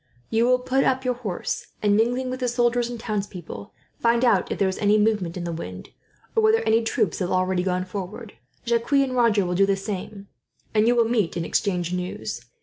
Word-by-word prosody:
You 225 +1 +3
will 255 0 +5
put 260 +2 +1
up 260 0 +1
your 250 - +2
horse 220 -7 -4 0.2
and, 205 -1 +4
mingling 245 +4 +1
with 255 - -4
the 250 - 0
soldiers 240 0 +1
and 240 -1 -6
townspeople, 195 - -5 0.3
find 235 +1 +3
out 200 -7 +2
if - - -2
there 195 - +2
is 190 - -3
any 210 0 +4
movement 210 -5 +1
in 175 - -4
the 170 - -3
wind, 90 - -7 0.5
or 450 - +4
whether 440 +1 +4
any 225 +1 +3
troops 220 - 0
have 180 -2 -1
already 185 0 +1
gone 185 0 -1
forward. 200 +4 -7 0.3
Jacques 235 +3 0
and 275 -2 +3
Roger 225 -5 +3
will 180 - -1
do 195 +2 +3
the 195 - +2
same, 195 0 -6 0.5
and 215 0 +3
you 240 - +4
will 235 -1 +4
meet 220 -7 0
and 165 - -2
exchange 180 -3 -1
news. 180 0 -4
215 Hz, 215 wpm, -24 LUFS, 185-240 Hz, 0.5 s, will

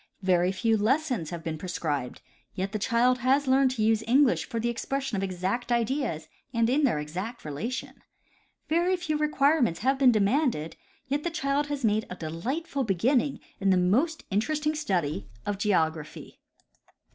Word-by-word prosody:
Very 180 -1 +3
few 225 +3 +1
lessons 245 - 0
have 170 -2 -6
been 160 -1 -4
prescribed,* 150 -8 -3 0.4
5^ 185 - -1
et 195 - -3
the 215 - -2
child 245 +4 +2
has 265 +4 +2
learned 265 0 +4
to 220 - 0
use 220 0 +2
English 260 +2 +4
for 230 -3 -2
the 235 - -1
expression 270 +1 -2
of 195 - -1
exact 195 +6 -2
ideas 235 - -1 0.2
and 230 -2 +2
in 290 +2 +3
their 235 - +2
exact 180 +11 -5
relation. 160 - -5 0.7
Very 345 +4 +2
few 345 -4 -2
requirements 290 - +2
have 265 +3 +1
been 260 -3 +6
de 220 - +2
manded, 200 - +1 0.3
yet 285 +2 -1
the 345 - 0
child 285 -2 -1
has 285 -4 -2
made 215 0 +1
a 180 - -6
delightful 260 - -3
beginning 245 +7 +1 0.2
in 195 -2 +1
the 185 - +4
most 255 - +1
interesting 300 +9 0
study 175 - -1 0.2
of 205 -1 -2
geography. 160 -7 -1
230 Hz, 170 wpm, -27 LUFS, 185-275 Hz, 0.7 s, been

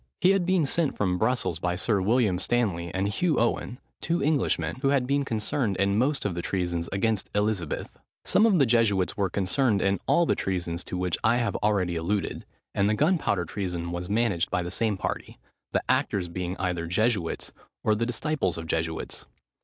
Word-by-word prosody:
He 185 - +5
had 195 -3 +1
been 185 -4 +3
sent 155 +1 0
from 90 -3 0
Brussels 110 -8 0
by 90 0 -1
Sir 100 +1 +1
William 105 -2 +2
Stanley 95 -7 0
and 95 +1 -1
Hugh 155 - +1
Owen, 120 +1 0 0.2
two 170 +1 0
Englishmen, 150 -3 +1
who 135 - -1
had 135 -2 +2
been 140 +2 +1
concerned 110 -2 -1
in 100 +1 +2
most 135 +1 +1
of 100 - 0
the 85 - -3
treasons 85 -2 -2
against 105 +1 0
Elizabeth. 105 -6 -1 0.3
Some 220 - +4
of 200 -5 +4
the 140 - +5
Jesuits 110 -6 +2
were 100 -2 0
concerned 100 +4 +1
in 100 0 +1
all 170 - +4
the - - +2
treasons 85 -2 -2
to 90 - -4
which 90 -1 -1
I 110 +2 +4
have 120 -1 -1
already 95 -5 +1
alluded; 95 +5 -2 0.3
and 100 +1 +2
the 105 - +2
gunpowder 145 - +1
treason 90 -2 -4
was 90 +1 -4
managed 100 -5 +1
by 90 - 0
the 90 - -5
same 110 -4 0
party, - - -4 0.3
the - - 0
actors 90 -3 +1
being 90 +1 -4
either 90 -3 -2
Jesuits, 100 -1 0 0.3
or 110 - +3
the 115 +2 0
disciples 125 - -1
of 80 - -5
Jesuits. 80 0 -3
100 Hz, 190 wpm, -27 LUFS, 90-120 Hz, 0.3 s, He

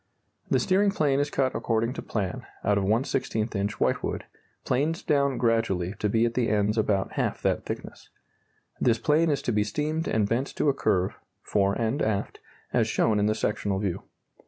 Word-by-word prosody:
The - - +3
steering 200 +2 +3
plane 145 -8 +1
is 145 0 0
cut 135 -2 0
according 115 +1 0
to - - -5
plan, 100 -5 -3 0.2
out 100 -1 +2
of - - -1
1/16 110 0 0
inch 100 +1 -2
whitewood, - - 0 0.4
planed 150 +6 0
down 140 -2 +2
gradually 110 -6 +1
to 105 - 0
be 115 +3 +3
at 120 - -1
the 120 -2 +1
ends 105 0 +2
about 105 -3 +1
half - - -2
that - - 0
thickness. - - -7 0.7
This 115 -2 +3
plane 155 +7 +2
is 145 -2 0
to - - 0
be 105 -1 +2
steamed 150 +9 -2
and 105 -2 +1
bent 120 +6 0
to 150 - +2
a - - +3
curve 95 -8 0 0.2
(fore 100 -1 +1
and 115 +6 -1
aft) 100 -2 -1 0.3
as - - +3
shown 105 -2 +2
in 105 - +2
the 110 - +1
sectional 105 -2 -1
view. 95 -3 -2
115 Hz, 185 wpm, -27 LUFS, 105-140 Hz, 0.7 s, The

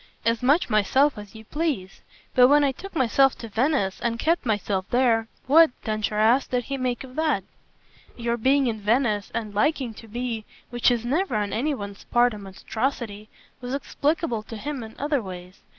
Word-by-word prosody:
"As 230 0 +1
much 285 +7 +3
myself 260 +7 +3
as 210 0 -11
you 220 0 -11
please. 280 - -3 0.3
But 250 0 +7
when 290 +2 +5
I 280 - +3
took 390 +9 -10
myself 270 0 +3
to 230 - -7
Venice 225 -3 0
and 230 -1 -1
kept 320 +1 0
myself 205 -3 -1
there 235 -3 +2 0.2
what," 320 +4 +7
Densher 215 -1 -2
asked, 225 +5 +3
"did 250 -1 0
he 275 +3 -4
make 250 -1 -2
of 255 -1 -12
that?" 305 -11 +1 0.7
"Your 235 -1 -1
being 265 +4 +3
in 220 -3 -2
Venice 215 -1 +1
and 215 -3 -3
liking 250 +2 0
to 225 - -13
be 235 0 -4 0.3
which 240 +1 +3
is 240 -1 0
never 305 - 0
on 205 -1 -1
any 285 +6 0
one's 200 -3 -8
part 240 0 +3
a 210 - -7
monstrosity 215 +2 -4 0.3
was 250 +2 -3
explicable 290 -3 -1
for 225 - -9
him 275 +4 -5
in 220 -1 -9
other 290 -2 0
ways. 180 -2 -9
240 Hz, 185 wpm, -25 LUFS, 215-275 Hz, 0.7 s, But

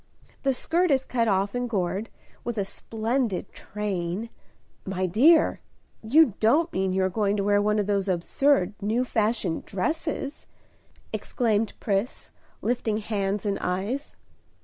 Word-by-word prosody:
The 275 - +2
skirt 340 +7 +1
is 265 -2 +2
cut 235 -2 0
off 200 0 +1
and 245 0 -2
gored, 195 0 -1 0.3
with 240 -1 -4
a 200 - 0
splendid 225 -1 -2
train 200 +1 -4 0.3
" - - -41 0.2
"My 185 -1 -2
dear, 275 - +5 0.4
you 265 +2 +5
don't 300 +10 +3
mean 190 0 0
you 190 0 +1
are - - +3
going 205 +1 0
to 200 - 0
wear 205 0 +3
one 210 +1 +2
of 205 - +1
those 200 -1 0
absurd, 190 +4 +2
new 225 +5 +1
fashioned 215 -7 0
dresses?" 290 - -3 0.7
exclaimed 225 -3 0
Pris, 205 +4 -2 0.3
lifting 225 -2 0
hands 205 -1 -2
and 200 -1 0
eyes. 200 +11 -2
210 Hz, 145 wpm, -26 LUFS, 195-245 Hz, 0.7 s, dear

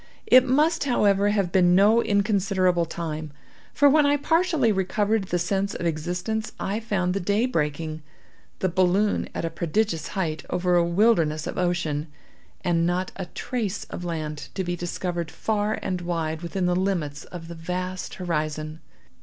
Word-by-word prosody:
It 255 0 +7
must, 300 +5 +2
however, 205 -6 +3
have 200 -4 0
been 180 -1 +4
no 210 +5 +5
inconsiderable 195 -4 +2
time, 155 -2 -5 0.4
for 285 - +4
when 300 +2 +5
I 285 0 +3
partially 320 -5 +2
recovered 205 +2 0
the 180 - -1
sense 195 +3 -1
of - - -4
existence, 180 +7 -2
I 200 +3 -2
found 190 -5 -1
the 200 - -1
day 205 +5 +1
breaking, 155 - -2 0.6
the 190 - 0
balloon 185 +4 +2
at - - -2
a 165 - -2
prodigious 165 +1 -1
height 160 -5 -1
over 180 0 +1
a 175 - +5
wilderness 170 -4 +2
of - - -4
ocean, 170 -4 -1 0.5
and 170 -1 +1
not 180 +1 -1
a 190 -2 -5
trace 225 -3 -3
of - - -5
land 155 -3 -4
to 190 - -1
be 175 0 -2
discovered 175 -1 -3
far 210 +6 -1
and 185 -2 -2
wide 165 -2 -2
within 180 +2 -2
the 180 0 +2
limits 170 -6 -1
of 170 -2 -9
the 170 - -7
vast 180 +2 -4
horizon. 155 -3 -3
180 Hz, 160 wpm, -25 LUFS, 165-205 Hz, 0.6 s, It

